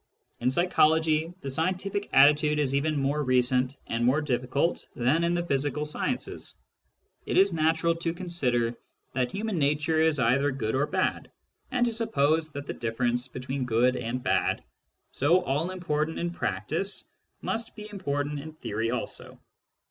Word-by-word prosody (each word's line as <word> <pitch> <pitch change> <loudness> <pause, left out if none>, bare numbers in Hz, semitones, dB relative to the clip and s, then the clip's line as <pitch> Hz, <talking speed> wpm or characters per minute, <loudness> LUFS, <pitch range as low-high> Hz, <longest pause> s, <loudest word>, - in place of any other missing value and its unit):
In 125 - +2
psychology, 160 +1 +3
the 140 - -4
scientific 185 +7 -1
attitude 150 +2 +5
is 140 -3 +1
even 150 +2 +1
more 140 +2 0
recent 130 0 +2
and 115 +1 -2
more 130 +5 +3
difficult 140 +2 -1
than 130 +8 +2
in 170 +1 +1
the 175 0 -1
physical 145 0 0
sciences: 150 - -3 0.7
it - - 0
is 195 -1 +5
natural 160 +1 +2
to 165 0 -1
consider 140 -10 -1 0.4
that 125 -1 0
human 210 -3 -2
nature 155 +2 +2
is 160 -2 +3
either 135 +3 +3
good 120 -5 -2
or 145 +3 +1
bad, - - -1 0.4
and 245 -1 +2
to 235 - 0
suppose 160 -9 +1
that 140 0 -6
the - - -4
difference 120 +2 -1
between 130 +2 -4
good 125 +2 +2
and 125 +2 -3
bad, - - +1 0.5
so 170 +7 +3
all 150 +3 0
important 160 -4 -2
in 170 0 -2
practice, 175 - -2 0.4
must 225 +1 -3
be 210 -1 -8
important 145 -6 -2
in 155 +2 -8
theory 115 -6 -3
also. 125 -1 -4
150 Hz, 155 wpm, -27 LUFS, 130-170 Hz, 0.7 s, attitude